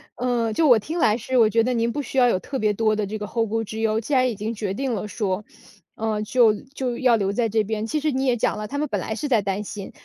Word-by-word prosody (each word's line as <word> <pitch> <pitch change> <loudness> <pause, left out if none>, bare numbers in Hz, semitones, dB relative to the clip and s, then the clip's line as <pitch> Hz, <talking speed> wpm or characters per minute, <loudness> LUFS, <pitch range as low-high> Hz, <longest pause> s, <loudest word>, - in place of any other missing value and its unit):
嗯， 235 -3 0
就 315 +6 +3
我 245 -3 +7
听 315 +11 -4
来 215 -4 +3
是， 255 +2 -2
我 220 -2 +6
觉 225 +2 +3
得 250 +1 0
您 230 0 0
不 290 - -4
需 265 - -1
要 245 - +6
有 185 - +2
特 270 +5 -5
别 215 -1 +2
多 215 +1 +1
的 210 -1 -1
这 215 +2 -4
个 210 - -5
后 225 +2 -1
顾 225 +1 -1
之 220 +1 -7
忧。 220 0 +1
既 275 +6 -4
然 255 -1 +4
已 225 - -4
经 215 +3 -4
决 205 -3 -3
定 265 -1 -2
了 210 0 -3
说， 205 -2 -2 0.5
呃， 215 -1 -2
就 225 0 +4
就 260 -3 -4
要 250 -3 +4
留 200 -2 0
在 230 +1 0
这 215 0 +2
边 220 +1 -3
其 305 - -1
实 305 0 0
你 265 +1 -1
也 245 -2 +2
讲 - - 0
了， 210 - -4
他 285 - -5
们 300 +1 -1
本 205 -3 -1
来 220 - -3
是 295 - -3
在 235 -6 +3
担 195 +1 -2
心， 200 -1 -7
225 Hz, 320 characters per minute, -23 LUFS, 210-250 Hz, 0.5 s, 我